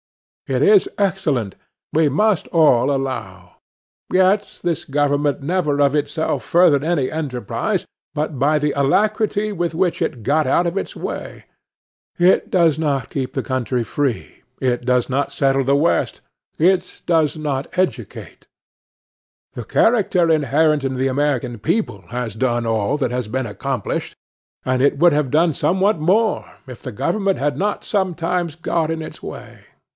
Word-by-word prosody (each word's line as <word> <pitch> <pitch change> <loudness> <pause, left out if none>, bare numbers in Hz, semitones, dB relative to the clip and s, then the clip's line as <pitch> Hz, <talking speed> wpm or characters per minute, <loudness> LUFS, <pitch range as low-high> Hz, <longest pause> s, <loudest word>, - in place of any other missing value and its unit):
It 130 +1 0
is 205 +1 +5
excellent, 170 - 0 0.4
we 155 -1 +3
must 210 +6 +1
all 145 -5 +3
allow; 95 -10 -5 0.5
yet 190 +2 +2
this 170 -3 -1
government 145 0 0
never 150 -2 0
of 140 0 +3
itself 155 +2 -1
furthered 165 -5 +4
any 155 -5 0
enterprise, 135 -9 -3 0.3
but 150 -1 -2
by 150 +4 +2
the 150 0 0
alacrity 210 +8 +1
with 175 -3 -2
which 180 0 0
it 115 - -2
got 150 +6 +1
out 175 - +2
of 170 - -3
its - - -3
way. - - -6 0.7
It 180 +5 +3
does 170 - +3
not 140 -4 -1
keep 130 -2 -3
the - - -3
country 130 -2 -1
free. 125 -4 -3 0.2
It 125 -2 0
does 125 -1 +1
not 140 +1 -1
settle 135 -1 +1
the 135 +2 +2
West. 155 +4 +1 0.4
It 180 +2 +1
does 160 -3 +2
not 145 -3 -2
educate. 185 0 -3 1.1
The - - -6
character 195 -7 +2
inherent 150 0 +2
in 135 -1 -2
the 130 +1 0
American 130 -4 -1
people 165 - -1
has 120 -2 -4
done 120 0 0
all 115 +4 0
that 135 -4 -1
has 125 -2 -2
been 130 +3 -2
accomplished; 105 - -4 0.5
and 130 0 +1
it 140 +1 +3
would 170 +2 +5
have 145 -3 0
done 160 +1 +3
somewhat 190 +5 +1
more, 205 +7 +2 0.2
if 125 -3 -10
the 130 - -6
government 195 - 0
had 145 -1 -1
not 205 +7 -2
sometimes 175 -4 -1
got 165 -1 -1
in 165 0 -3
its 155 - -10
way. - - -9
150 Hz, 150 wpm, -20 LUFS, 130-175 Hz, 1.1 s, is